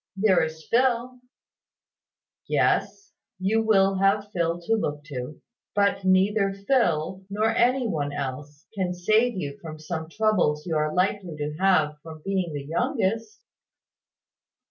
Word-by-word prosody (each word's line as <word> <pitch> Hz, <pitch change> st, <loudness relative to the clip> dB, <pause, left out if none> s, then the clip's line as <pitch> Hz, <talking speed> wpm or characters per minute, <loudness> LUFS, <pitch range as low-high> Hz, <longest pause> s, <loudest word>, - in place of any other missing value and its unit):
"There 195 Hz, -3 st, +4 dB
is 160 Hz, 0 st, -5 dB
Phil 250 Hz, 0 st, +1 dB, 0.6 s
" -, -, -68 dB, 0.7 s
"Yes. 400 Hz, -, 0 dB, 0.3 s
You 200 Hz, +4 st, +1 dB
will 195 Hz, -3 st, +3 dB
have 200 Hz, +1 st, +2 dB
Phil 170 Hz, -2 st, -1 dB
to 200 Hz, +6 st, 0 dB
look 150 Hz, -9 st, -1 dB
to. 140 Hz, -1 st, -7 dB, 0.4 s
But 200 Hz, -1 st, +2 dB
neither 195 Hz, +2 st, +3 dB
Phil, 195 Hz, -, 0 dB
nor 215 Hz, +3 st, +1 dB
any 250 Hz, +1 st, +3 dB
one 145 Hz, -8 st, -2 dB
else, 145 Hz, +3 st, -6 dB
can 185 Hz, -3 st, -2 dB
save 215 Hz, +5 st, +2 dB
you 140 Hz, -5 st, -5 dB
from 155 Hz, -1 st, -8 dB
some 160 Hz, +1 st, -5 dB
troubles 185 Hz, -7 st, +1 dB
you 165 Hz, -3 st, -2 dB
are 155 Hz, 0 st, +1 dB
likely 185 Hz, -1 st, -1 dB
to 150 Hz, 0 st, -3 dB
have 155 Hz, -6 st, +2 dB
from 155 Hz, -1 st, -11 dB
being 190 Hz, -3 st, -1 dB
the 145 Hz, -2 st, -5 dB
youngest." 225 Hz, -, -1 dB
185 Hz, 140 wpm, -25 LUFS, 155-215 Hz, 0.7 s, There